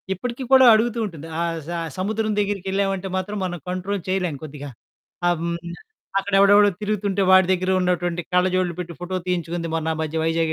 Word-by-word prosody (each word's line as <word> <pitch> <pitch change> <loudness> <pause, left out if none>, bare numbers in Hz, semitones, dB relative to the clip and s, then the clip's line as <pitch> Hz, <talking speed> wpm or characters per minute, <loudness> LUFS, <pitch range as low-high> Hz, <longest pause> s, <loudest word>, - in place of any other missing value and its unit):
ఇప్పటికి 245 +6 -5
కూడా 260 -1 +8
అడుగుతూ 230 +1 +1
ఉంటుంది. 165 -5 -8
ఆ - - 0 0.3
స - - -8 0.3
సముద్రం 215 +3 -1
దగ్గరికెళ్ళామంటే 195 -1 -1
మాత్రం 205 +3 -3
మనం 175 -2 -4
కంట్రోల్ 185 +1 -3
చేయలేను 180 -7 -1
కొద్దిగా. 145 -1 -8 0.7
హ్మ్. 170 0 -1 0.6
అక్కడెవడెవడో 200 +1 +5
తిరుగుతుంటే 205 -1 -1
వాడి 190 -1 +7
దగ్గర 185 +1 0
ఉన్నటువంటి 175 -1 0
కళ్ళజోడులు 180 -1 +2
పెట్టి 175 -1 -6
ఫోటో 185 +1 -3
తీయించుకుంది 170 -1 -2
మొన్న 160 0 -2
ఆ - - -7
మధ్య 160 +1 -4
వైజాగ్ 165 0 +1
185 Hz, 155 wpm, -22 LUFS, 170-200 Hz, 0.7 s, కూడా